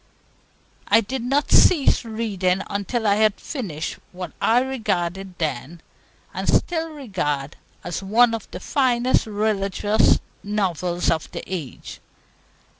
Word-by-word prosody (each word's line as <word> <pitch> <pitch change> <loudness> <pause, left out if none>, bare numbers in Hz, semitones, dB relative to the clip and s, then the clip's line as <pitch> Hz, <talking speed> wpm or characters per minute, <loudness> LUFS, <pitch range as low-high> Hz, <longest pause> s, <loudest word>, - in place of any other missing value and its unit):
I 225 - +5
did 255 +4 -4
not 275 +5 0
cease 305 -8 +5
reading 200 -5 -1
until 205 +3 -2
I 205 -1 +4
had 215 -1 +3
finished 175 - -5
what 180 0 -7
I 235 +2 +4
regarded 195 -8 -2
then, 155 +1 -3 0.5
and - - -4
still 325 -1 +1
regard, 180 - -3 0.3
as 175 +2 -4
one 230 +4 +4
of 225 -2 -5
the 180 - -7
finest 250 +1 +1
religious 205 0 +2 0.2
novels 180 -4 -1
of 160 -2 -2
the - - -5
age. 165 -9 -7
205 Hz, 120 wpm, -23 LUFS, 180-235 Hz, 0.5 s, I